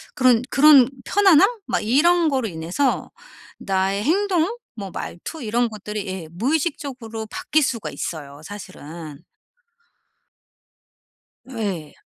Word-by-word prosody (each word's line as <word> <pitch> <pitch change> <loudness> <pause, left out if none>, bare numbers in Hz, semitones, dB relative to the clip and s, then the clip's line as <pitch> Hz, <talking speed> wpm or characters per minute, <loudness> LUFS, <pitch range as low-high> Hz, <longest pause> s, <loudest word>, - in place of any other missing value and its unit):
그런 250 -2 +4
그런 275 -3 +7 0.2
편안함 390 -1 +5 0.2
막 - - 0
이런 320 +9 +3
거로 260 -4 0
인해서 175 - -1 0.5
나의 195 +1 0
행동 380 - +1 0.2
뭐 200 -4 -7
말투 295 - -7
이런 235 +2 +1
것들이 210 -1 -6
예 185 -4 -5
무의식적으로 255 - -2
바뀔 310 +6 0
수가 230 -4 -2
있어요 145 -3 -6
사실은. 165 -5 -9 2.2
예. 200 - -4
230 Hz, 225 characters per minute, -22 LUFS, 190-295 Hz, 2.2 s, 그런